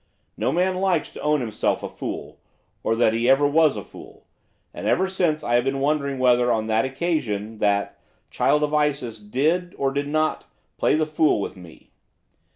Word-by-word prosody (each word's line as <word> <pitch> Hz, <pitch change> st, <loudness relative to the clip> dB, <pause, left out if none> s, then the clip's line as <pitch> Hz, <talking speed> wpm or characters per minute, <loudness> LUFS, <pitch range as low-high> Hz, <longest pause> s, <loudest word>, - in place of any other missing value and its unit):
No -, -, 0 dB
man 185 Hz, +1 st, +1 dB
likes 185 Hz, -4 st, 0 dB
to -, -, -9 dB
own 150 Hz, -1 st, +1 dB
himself 110 Hz, -3 st, -1 dB
a -, -, -2 dB
fool, -, -, -7 dB, 0.4 s
or 115 Hz, -, 0 dB
that 115 Hz, -1 st, +3 dB
he 115 Hz, +2 st, +1 dB
ever 135 Hz, +2 st, +5 dB
was 150 Hz, 0 st, +3 dB
a -, -, -5 dB
fool, -, -, -14 dB, 0.5 s
and -, -, -5 dB
ever 190 Hz, -, +2 dB
since 175 Hz, -5 st, 0 dB
I 120 Hz, -, -1 dB
have 120 Hz, 0 st, +4 dB
been 135 Hz, +1 st, -1 dB
wondering 140 Hz, -1 st, 0 dB
whether, 125 Hz, -1 st, +3 dB
on 110 Hz, -1 st, 0 dB
that 110 Hz, +2 st, +1 dB
occasion, 130 Hz, -8 st, -2 dB
that 100 Hz, -1 st, 0 dB, 0.3 s
'child 150 Hz, 0 st, +2 dB
of 150 Hz, 0 st, -1 dB
Isis' 140 Hz, -7 st, 0 dB
did, 155 Hz, +12 st, -1 dB
or 135 Hz, -1 st, 0 dB
did 140 Hz, +1 st, -2 dB
not, 155 Hz, +1 st, 0 dB, 0.3 s
play -, -, +3 dB
the 155 Hz, 0 st, +1 dB
fool 155 Hz, -4 st, +2 dB
with 100 Hz, -, -4 dB
me. 85 Hz, -4 st, -15 dB
140 Hz, 185 wpm, -23 LUFS, 115-155 Hz, 0.5 s, ever